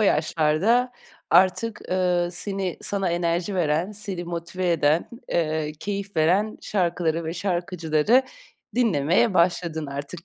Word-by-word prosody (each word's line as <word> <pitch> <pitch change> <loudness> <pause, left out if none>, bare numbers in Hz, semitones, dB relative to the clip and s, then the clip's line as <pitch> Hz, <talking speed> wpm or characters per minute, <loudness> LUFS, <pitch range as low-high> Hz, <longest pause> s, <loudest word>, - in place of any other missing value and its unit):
yaşlarda 190 +7 +2 0.4
artık, 190 +5 +3
ııı, 180 -1 +1
seni 190 0 -3
sana 195 -3 -1
enerji 170 +3 -1
veren, 170 +3 0
seni 195 -4 -5
motive 175 +1 -2
eden, 155 0 +2 0.2
eee, 155 -2 -1
keyif 200 0 -4
veren 185 +7 +2
şarkıları 170 -4 -1
ve 160 - -3
şarkıcıları 175 - +1 0.5
dinlemeye 190 - +2
başladın 170 -3 +1
artık. 140 +5 -7
175 Hz, 110 wpm, -24 LUFS, 160-195 Hz, 0.5 s, artık